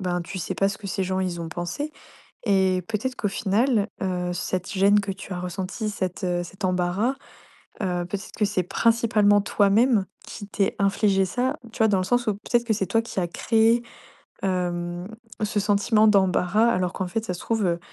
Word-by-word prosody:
ben, 180 Hz, -2 st, -1 dB
tu 185 Hz, +3 st, -6 dB
sais -, -, -3 dB
pas 195 Hz, -, +2 dB
ce 200 Hz, -, -5 dB
que 210 Hz, -, -8 dB
ces 190 Hz, 0 st, -1 dB
gens, 185 Hz, +1 st, -1 dB
ils 180 Hz, -2 st, -2 dB
ont 165 Hz, -, -5 dB
pensé. 175 Hz, -, -4 dB, 0.5 s
Et 190 Hz, -3 st, +2 dB
peut-être 225 Hz, +4 st, -2 dB
qu'au 205 Hz, -, -1 dB
final, 215 Hz, +2 st, +1 dB, 0.2 s
heu, 180 Hz, -1 st, -1 dB
cette 180 Hz, +1 st, -3 dB
gêne 200 Hz, 0 st, +4 dB
que 200 Hz, -1 st, -3 dB
tu 195 Hz, -, -11 dB
as 180 Hz, -, -4 dB
ressentie, 190 Hz, +4 st, -4 dB
cet, 185 Hz, -2 st, -4 dB
heu, 175 Hz, -1 st, 0 dB
cet 185 Hz, +2 st, -6 dB
embarras, 185 Hz, +7 st, 0 dB, 0.7 s
heu, 180 Hz, -2 st, -1 dB
peut-être 195 Hz, +1 st, -6 dB
que 215 Hz, -, +1 dB
c'est 190 Hz, -3 st, -1 dB
principalement 215 Hz, 0 st, +3 dB
toi-même 205 Hz, +1 st, +3 dB, 0.2 s
qui 205 Hz, -, -8 dB
t'es 200 Hz, -1 st, 0 dB
infligé 195 Hz, -1 st, +3 dB
ça. 255 Hz, +8 st, -1 dB, 0.2 s
Tu -, -, -10 dB
vois, 220 Hz, -, +5 dB
dans 200 Hz, -2 st, +3 dB
le 185 Hz, -, 0 dB
sens 245 Hz, +5 st, +1 dB
où 210 Hz, -, +2 dB
peut-être 235 Hz, +4 st, 0 dB
que 230 Hz, -, +1 dB
c'est 195 Hz, -2 st, -1 dB
toi 225 Hz, -, +2 dB
qui 225 Hz, -4 st, -4 dB
a 175 Hz, -, -1 dB
créé, 225 Hz, +6 st, +2 dB, 0.6 s
hem, 175 Hz, -1 st, -2 dB, 0.4 s
ce 210 Hz, 0 st, 0 dB
sentiment 205 Hz, +2 st, +3 dB
d'embarras, 195 Hz, +1 st, +3 dB
alors 180 Hz, -5 st, 0 dB
qu'en 190 Hz, -, -3 dB
fait, 220 Hz, +5 st, -3 dB
ça 185 Hz, -, -2 dB
se -, -, -9 dB
trouve, 225 Hz, -3 st, 0 dB
heu, 170 Hz, -1 st, 0 dB
195 Hz, 200 wpm, -24 LUFS, 180-215 Hz, 0.7 s, vois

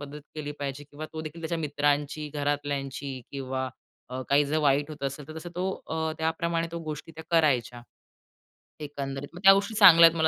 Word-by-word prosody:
मदत 145 Hz, +1 st, -8 dB
केली 150 Hz, -1 st, -4 dB
पाहिजे 140 Hz, +1 st, -4 dB
किंवा 155 Hz, +2 st, -7 dB
तो 160 Hz, -, -4 dB
देखील 160 Hz, +2 st, -8 dB
त्याच्या 165 Hz, +1 st, -2 dB
मित्रांची, 145 Hz, 0 st, 0 dB
घरातल्यांची 140 Hz, -2 st, -2 dB
किंवा 130 Hz, -1 st, -3 dB, 0.4 s
अ, 130 Hz, +1 st, -4 dB
काही 145 Hz, +1 st, +5 dB
जर 155 Hz, +2 st, 0 dB
वाईट 145 Hz, +2 st, +3 dB
होत 150 Hz, -2 st, -9 dB
असेल 140 Hz, +1 st, -4 dB
तर 155 Hz, -, -8 dB
तसं 175 Hz, +2 st, -7 dB
तो 180 Hz, -, -1 dB, 0.2 s
अ, 160 Hz, 0 st, -1 dB
त्याप्रमाणे 165 Hz, +1 st, 0 dB
तो 170 Hz, -, -3 dB
गोष्टी 155 Hz, +1 st, -6 dB
त्या 160 Hz, -, -8 dB
करायच्या, 125 Hz, -7 st, +2 dB, 1.0 s
एकंदरीत. 140 Hz, -1 st, -5 dB
मग 175 Hz, -, -9 dB
त्या 195 Hz, 0 st, +10 dB
गोष्टी 200 Hz, +2 st, 0 dB
चांगल्या 170 Hz, -6 st, +10 dB
आहेत 165 Hz, 0 st, 0 dB
मला 160 Hz, 0 st, +4 dB
150 Hz, 185 wpm, -28 LUFS, 140-160 Hz, 1.0 s, त्या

